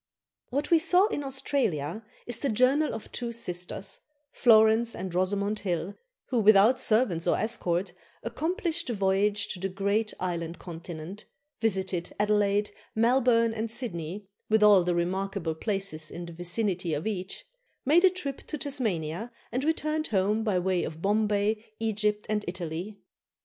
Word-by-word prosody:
"What 285 +5 -2
We 335 - +7
Saw 360 +3 +4
in 290 - -3
Australia" 225 - -1 0.2
is 240 - 0
the 280 - 0
journal 260 +7 +3
of 220 - -8
two 240 -1 -3
sisters, 180 -3 -4 0.3
Florence 225 0 +5
and 185 -2 -5
Rosamond 200 +3 0
Hill, 180 0 -2 0.4
who, 250 - +1
without 215 +4 +6
servants 215 -9 +2
or - - +3
escort, 185 -5 -1 0.3
accomplished 335 - -2
the 240 - -2
voyage 200 +1 +1
to 185 - -4
the 195 +1 -2
great 200 +3 0
island 170 -2 -3
continent; 170 +2 -8 0.3
visited 190 -5 -1
Adelaide, 205 0 +2 0.2
Melbourne, 230 0 +3
and 225 +1 -3
Sydney, 205 -5 -2 0.2
with 220 0 +4
all 205 -3 +7
the 175 0 0
remarkable 185 0 -1
places 195 -4 -2
in 175 - -7
the 170 - -9
vicinity 175 -1 -1
of 150 - -4
each; 195 -3 -4 0.4
made 320 +6 +5
a 375 - +8
trip 290 -7 -5
to 305 - -3
Tasmania, 225 - -2 0.2
and 255 +4 -1
returned 310 0 0
home 210 +2 +1
by 210 -4 +1
way 180 0 +1
of 160 +1 -6
Bombay, 210 +1 +1 0.2
Egypt, 210 -1 0
and 210 -1 -1
Italy. 175 +3 -5
210 Hz, 150 wpm, -28 LUFS, 180-235 Hz, 0.4 s, a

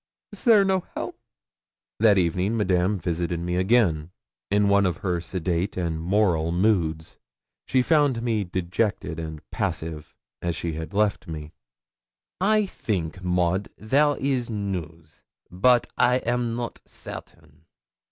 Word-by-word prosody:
Is - - -9
there 215 -4 +6
no 190 -1 +2 0.2
help?' - - -5 0.8
That 105 -2 +5
evening 90 +5 +1
Madame 95 -1 +2
visited 85 0 -2
me 90 +1 -2
again, 90 -5 +2 0.4
in 105 0 +3
one 100 -1 +4
of 85 -2 -2
her 90 -2 0
sedate 90 +2 -2
and 85 -3 -2
moral 85 -3 +2
moods. 85 -4 0 0.5
She 130 -1 +3
found 145 -6 +2
me 110 -3 +1
dejected 90 -1 -2
and 80 -2 -7
passive, 80 -2 -4 0.3
as 85 -1 -1
she 85 +1 -3
had 80 +5 -6
left 105 -2 +1
me. 75 -2 -7 0.9
'I 210 +3 +3
think, 90 - -3
Maud, 90 +2 +1
there 145 +7 +2
is 130 -3 -1
news; 85 -7 -5 0.3
but 120 +7 +4
I 125 +1 +5
am 120 -2 0
not 120 0 -5
certain.' 80 0 -11
95 Hz, 135 wpm, -25 LUFS, 85-115 Hz, 0.9 s, there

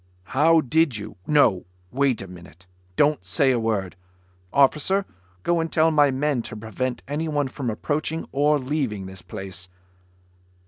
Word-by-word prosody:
"How 160 +4 +5
did 155 -2 +2
you... 100 - -8
no! 130 -11 +3 0.3
Wait 135 -4 +1
a - - -9
minute. 90 0 -14 0.3
Don't 150 +5 +2
say 140 -4 +2
a 125 - +1
word. 105 -5 -1 0.6
Officer, 150 +8 +3 0.4
go 175 -1 +2
and 165 0 -2
tell 160 0 +3
my 145 -2 +4
men 135 -1 0
to 115 -1 -8
prevent 120 +4 -4
anyone 145 0 -1
from 130 -1 -4
approaching 155 +8 -2
or 150 +2 +3
leaving 130 -8 -2
this 95 -1 -10
place." 90 +1 -8
135 Hz, 145 wpm, -24 LUFS, 105-150 Hz, 0.6 s, How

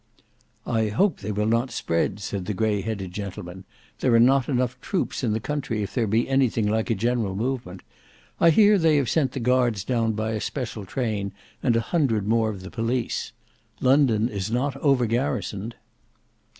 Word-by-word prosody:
"I 110 -2 +1
hope 175 - +1
they 105 +1 -4
will 105 +1 0
not 115 +3 +1
spread," 100 -3 -1
said 100 -2 -4
the 105 - -3
grey 105 -1 +1
headed 100 -3 -4
gentleman. 95 -1 -7 0.3
"There 120 - +3
are - - +6
not 130 +2 +5 0.4
troops 185 -5 -2
enough - - +1
in - - +1
the 110 - 0
country 120 -5 -2
if 100 - -6
there 120 -4 0
be 110 +4 +1
anything 130 -5 +2
like 110 +2 0
a 115 - +2
general 115 -2 0
movement. 115 -5 -3 0.6
I 170 - +6
hear 205 +4 +5
they 160 -3 +4
have 135 -5 +1
sent 140 -6 +1
the - - -3
guards 120 -4 +1
down 115 -2 0
by 110 +1 -2
a 110 -1 -2
special 115 -6 -4
train, 105 -3 -2 0.3
and 120 -3 +2
a 115 - +2
hundred 115 - 0
more 110 0 +2
of 100 -3 -6
the 95 - -9
police. 120 0 -2 0.5
London 130 -5 +3
is 100 -3 -4
not 125 +4 -1
over 135 -4 +2
garrisoned." 115 -2 -2
115 Hz, 185 wpm, -24 LUFS, 105-130 Hz, 0.6 s, are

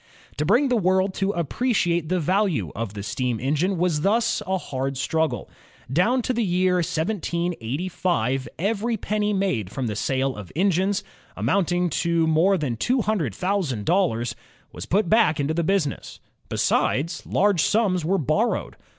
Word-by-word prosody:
To 150 - 0
bring 255 +7 +4
the 250 - +2
world 190 -2 +2
to 195 0 -1
appreciate 175 - 0
the 185 0 +1
value 175 - 0
of 105 -2 -4
the 100 - -5
steam 120 +1 -2
engine 155 +8 0
was 165 -3 +1
thus 225 +5 +1
a 190 0 +1
hard 135 -5 -4
struggle. 160 +4 -1 0.5
Down 230 - +2
to 255 - 0
the 235 -1 0
year 180 -1 +2
1785 170 - -1
every 220 +4 -1
penny 210 +1 -1
made 190 - 0
from 130 - -3
the 105 -3 -2
sale 130 +4 0
of 100 -4 -9
engines, 190 +2 +1 0.3
amounting 180 -2 +1
to 170 -1 +2
more 165 +5 +3
than 135 -8 -2
two 250 - +1
himdred 175 - -1
thousand 180 - -1
dollars, 165 -11 +1 0.4
was 90 +5 -8
put 200 0 +2
back 170 -7 +3
into 145 +2 0
the 170 +1 0
business. 175 -6 -1 0.3
Besides, 155 +6 0
large 200 -4 +2
sums 195 -5 +2
were 190 +5 +1
borrowed. 165 - 0
175 Hz, 155 wpm, -24 LUFS, 140-200 Hz, 0.5 s, bring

